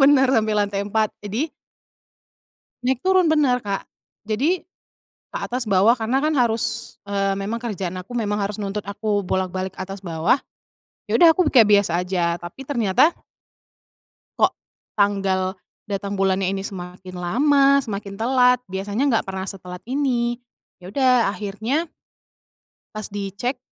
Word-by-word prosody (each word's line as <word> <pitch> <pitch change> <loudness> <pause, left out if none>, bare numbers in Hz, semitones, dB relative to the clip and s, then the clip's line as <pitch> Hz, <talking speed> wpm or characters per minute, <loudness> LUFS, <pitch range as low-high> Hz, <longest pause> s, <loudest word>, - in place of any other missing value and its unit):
Bener, 275 -2 +6
sampai 215 -2 +2
lantai 205 -1 0
4. 215 +1 +1 0.2
Jadi 235 +11 -2 1.3
Naik 255 0 +1
turun, 370 -3 +4
bener 280 -5 +3
Kak. 200 -1 -3 0.4
Jadi 285 +13 0 0.7
ke - - -4
atas 255 - -3
bawah 200 +3 +4
karena 240 +2 0
kan 305 +3 +1
harus, 235 -4 0
eee, 195 -1 0
memang 220 +4 -3
kerjaan 195 -6 -3
aku 195 - -13
memang 205 -2 -1
harus 200 +1 -3
nuntut 205 0 -3
aku 205 0 -1
bolak-balik 185 0 -2
atas 195 +1 -6
bawah, 165 +5 +2 0.7
ya - - -5
udah 340 -2 +8
aku 345 +1 +2
kayak 230 -7 +5
biasa 195 -5 0
aja 175 -2 0
tapi 175 +10 -10
ternyata 240 - +3 1.2
kok - - +4 0.5
tanggal 195 -2 +1 0.3
datang 200 0 -3
bulannya 190 -1 +2
ini 195 0 -3
semakin 185 0 -8
lama, 275 +10 +4
semakin 200 -3 -5
telat 250 +2 +4
biasanya 200 +6 -2
enggak 225 - +1
pernah 190 0 -3
setelat 180 -2 -8
ini. 245 -3 0 0.4
Ya 180 - -9
udah 250 -1 +3
akhirnya 220 +10 -2 1.1
pas 215 -1 -5
dicek 205 +6 -3
210 Hz, 135 wpm, -22 LUFS, 195-250 Hz, 1.3 s, udah